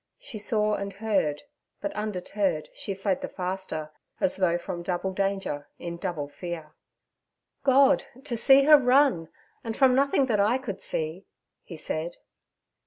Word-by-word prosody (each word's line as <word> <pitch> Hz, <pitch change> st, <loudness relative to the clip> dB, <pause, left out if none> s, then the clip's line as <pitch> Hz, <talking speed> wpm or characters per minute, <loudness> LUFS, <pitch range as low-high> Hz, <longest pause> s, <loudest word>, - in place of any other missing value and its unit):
She 220 Hz, -, -8 dB
saw 210 Hz, 0 st, +1 dB
and 200 Hz, -1 st, -3 dB
heard, 195 Hz, -8 st, -1 dB, 0.4 s
but, 200 Hz, -, -3 dB
undeterred, 195 Hz, -5 st, -2 dB
she 195 Hz, -, -4 dB
fled 195 Hz, -1 st, -1 dB
the -, -, -3 dB
faster, 180 Hz, -5 st, -5 dB, 0.3 s
as 185 Hz, -, +1 dB
though 175 Hz, -3 st, +2 dB
from 175 Hz, 0 st, -6 dB
double 180 Hz, +2 st, -2 dB
danger 195 Hz, -7 st, -2 dB
in 170 Hz, 0 st, -6 dB
double 160 Hz, -4 st, -4 dB
fear. 165 Hz, 0 st, -7 dB, 0.9 s
'God! 270 Hz, 0 st, +4 dB, 0.2 s
to 265 Hz, -4 st, -3 dB
see 270 Hz, +4 st, +8 dB
her 300 Hz, +1 st, +8 dB
run, 250 Hz, -, +3 dB, 0.3 s
and 225 Hz, -1 st, -5 dB
from 265 Hz, -2 st, +5 dB
nothing 275 Hz, +1 st, +3 dB
that 225 Hz, -5 st, 0 dB
I 215 Hz, +5 st, +3 dB
could 215 Hz, -8 st, -6 dB
see' 160 Hz, +4 st, -3 dB, 0.3 s
he 170 Hz, -, -10 dB
said. 160 Hz, +2 st, -4 dB
195 Hz, 150 wpm, -26 LUFS, 175-225 Hz, 0.9 s, see